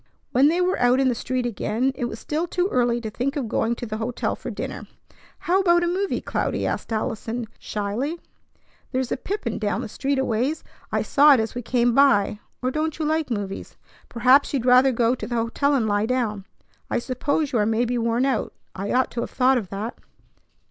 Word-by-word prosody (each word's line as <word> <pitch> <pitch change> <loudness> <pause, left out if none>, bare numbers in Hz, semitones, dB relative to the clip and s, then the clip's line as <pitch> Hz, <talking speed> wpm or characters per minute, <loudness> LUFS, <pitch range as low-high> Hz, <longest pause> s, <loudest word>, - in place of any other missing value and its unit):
When 265 +3 +5
they 340 +4 +2
were 365 +1 +1
out 245 +1 +4
in 265 -1 +3
the - - +2
street 250 +1 -2
again, 240 +3 0
it 245 - -3
was 230 -2 -5
still 310 +8 -2
too 360 +1 0
early 240 -4 +1
to 220 -2 -5
think 275 +6 -2
of 275 -6 -2
going 225 +2 0
to 240 - -6
the 215 -1 -4
hotel 230 +2 -2
for - - -7
dinner. - - -6 0.5
"How 365 +3 +1
about 345 -2 +4
a - - +1
movie, 380 +3 -1
Cloudy?" - - -2
asked - - -3
Allison 225 +2 -2
shyly. 225 +11 -3 0.7
"There's 255 -1 -1
a - - +2
pippin 310 - -4
down 210 -1 -1
the - - -5
street 275 +6 -2
a 265 - +1
ways. 250 +8 -1 0.3
I - - +1
saw 290 0 +6
it - - +1
as 220 0 -2
we 245 - -4
came 240 0 +1
by. 220 -7 +4 0.2
Or 255 - +1
don't 310 +2 -2
you 310 - -2
like 315 -1 0
movies? 205 -4 -5 0.3
Perhaps 255 +4 +4
you'd 250 -3 -1
rather 255 +1 +6
go 235 0 +2
to 255 - -5
the 240 - -3
hotel 240 +5 +1
and 245 -5 +1
lie 205 +1 +1
down. 220 -6 -1 0.4
I - - 0
suppose 280 +4 -1
you 240 - +1
are 210 - +2
maybe 235 +2 +1
worn 235 +2 +1
out. 260 -5 -1 0.2
I 195 +2 -4
ought 255 0 +2
to 235 - -3
have - - -4
thought 260 0 +3
of 195 -6 -8
that." 205 +4 -5
245 Hz, 215 wpm, -24 LUFS, 225-280 Hz, 0.7 s, saw